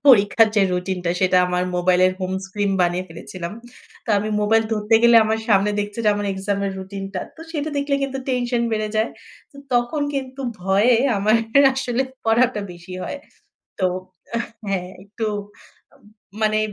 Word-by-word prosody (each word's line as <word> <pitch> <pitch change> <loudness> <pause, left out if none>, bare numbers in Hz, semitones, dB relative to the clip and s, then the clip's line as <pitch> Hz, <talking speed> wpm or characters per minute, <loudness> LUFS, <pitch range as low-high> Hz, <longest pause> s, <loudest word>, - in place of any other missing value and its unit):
পরীক্ষার 220 -2 +6
যে, 200 - +5
রুটিনটা 180 -1 -2
সেটা 185 0 +4
আমার 180 0 0
মোবাইলের 185 +1 +3
হোম 185 0 -2
স্ক্রিন 200 +1 -1
বানিয়ে 175 +1 +1
ফেলেছিলাম। 170 +2 -7 0.5
তো - - -20
আমি 210 +2 -2
মোবাইল 225 +2 +3
ধরতে 210 +1 +1
গেলে 235 0 +7
আমার 220 0 0
সামনে 205 0 +4
দেখছে 205 +2 -5
যে - - +5
আমার 205 0 -2
এক্সামের 200 0 -2
রুটিন 195 +1 -6
টা। 185 - -1 0.2
তো 320 - -13
সেটা 305 -2 -2
দেখলে 280 0 0
কিন্তু 270 -1 -2
টেনশন 245 -1 0
বেড়ে 215 -1 -1
যায়। 220 +1 +2 0.4
তো 280 - -16 0.2
তখন 240 +5 +1
কিন্তু 265 0 -4 0.2
ভয়ে 195 +6 +3 0.2
আমার 210 +3 +3 0.4
আসলে 260 -1 0 0.2
পড়াটা 230 0 +3
বেশি 175 +1 -12
হয়। 285 - -5 0.6
তো 185 - +2 0.5
এহ 235 - -1 0.2
হ্যাঁ, 180 -2 -2
একটু 215 +3 -5 0.7
উম - - -26 0.4
মানে 215 0 +2
210 Hz, 160 wpm, -21 LUFS, 190-235 Hz, 0.7 s, গেলে